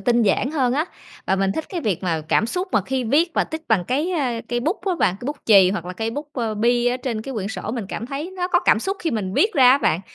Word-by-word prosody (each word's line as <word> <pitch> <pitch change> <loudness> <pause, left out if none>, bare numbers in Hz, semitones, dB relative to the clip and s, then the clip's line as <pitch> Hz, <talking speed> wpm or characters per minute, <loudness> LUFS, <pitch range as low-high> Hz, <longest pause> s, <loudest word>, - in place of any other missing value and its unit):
tinh 240 -1 +2
giản 215 +5 +1
hơn 265 -6 +1
á. 295 +4 +1 0.4
Và 190 - +2
mình 195 0 +1
thích 320 - -3
cái 360 - -4
việc 205 - -1
mà 165 -4 -1
cảm 220 - +3
xúc 360 +10 -2
mà - - +4
khi 260 +4 -2
viết 300 +9 +2
và - - +2
tích 315 0 -6
bằng 210 -6 +2
cái, 290 - -1
ơ, 255 -9 -1
cây 240 0 -1
bút 325 - -1
á 375 - +2
bạn, 185 - +2
cây 245 - -6
bút 290 +1 -3
chì 195 -4 +6
hoặc 180 -4 -3
là 180 - -5
cây 220 +5 -3
bút, 290 +5 -6
ờ, 230 -4 -2
bi 240 +3 +2
ở 245 +1 +2
trên 245 -4 -4
cái 270 +3 -6
quyển 200 -3 -3
sổ. 215 -1 -5
Mình 230 -5 -4
cảm 230 - -5
thấy 280 +7 -5
nó 360 0 -1
có - - +3
cảm - - +4
xúc 390 +1 -2
khi 330 - -1
mình 195 -4 -3
viết 435 +2 +3
ra 255 -3 +7
á 270 - +5
bạn. 170 - +1
245 Hz, 300 wpm, -22 LUFS, 215-295 Hz, 0.4 s, ra